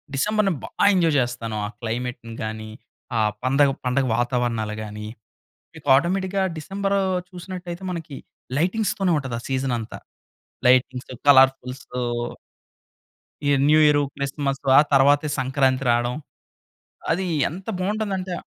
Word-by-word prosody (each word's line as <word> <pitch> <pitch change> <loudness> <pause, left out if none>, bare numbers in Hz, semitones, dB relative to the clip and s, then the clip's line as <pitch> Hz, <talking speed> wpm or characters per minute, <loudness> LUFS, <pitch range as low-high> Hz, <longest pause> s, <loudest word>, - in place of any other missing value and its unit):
డిసెంబర్‌ని 210 +5 +1
బా - - -6 0.2
ఎంజాయ్ 165 -5 +2
చేస్తాను. 120 -3 -2
ఆ - - -7
క్లైమెట్‌ని 120 0 -4
గానీ, 110 0 -5 0.5
ఆ - - +2 0.2
పందగ 135 +2 +3
పండగ 130 +2 +1
వాతావరణాలు 120 -3 -1
గానీ, 105 0 -7 0.7
మీకు 145 -3 -11
ఆటోమేటిక్‌గా 190 +4 0
డిసెంబరు 195 +4 -1 0.3
చూసినట్టయితే, 180 -1 -7
మనకి 160 -5 -6 0.4
లైటింగ్స్‌తోనే 190 +1 +1
ఉంటది 130 -4 -4
ఆ - - -14
సీజన్ 130 -1 -1
అంతా. 110 - -7 0.7
లైటింగ్స్‌‌తో, 130 0 +2
కలర్ఫుల్స్‌తో 130 -2 +3 1.5
ఈ - - +3 0.2
న్యూ 155 +1 +5
ఇయరు, 145 -1 +4
క్రిస్మస్ 140 0 -2 0.2
ఆ - - +8
తరువాతే 145 +2 +4
సంక్రాంతి 130 0 +1
రాడం. 120 +1 +1 1.0
అది 185 +3 -1 0.2
ఎంత 185 +5 -9
బావుంటుందంటే 195 -2 -2
140 Hz, 115 wpm, -23 LUFS, 125-180 Hz, 1.5 s, ఆ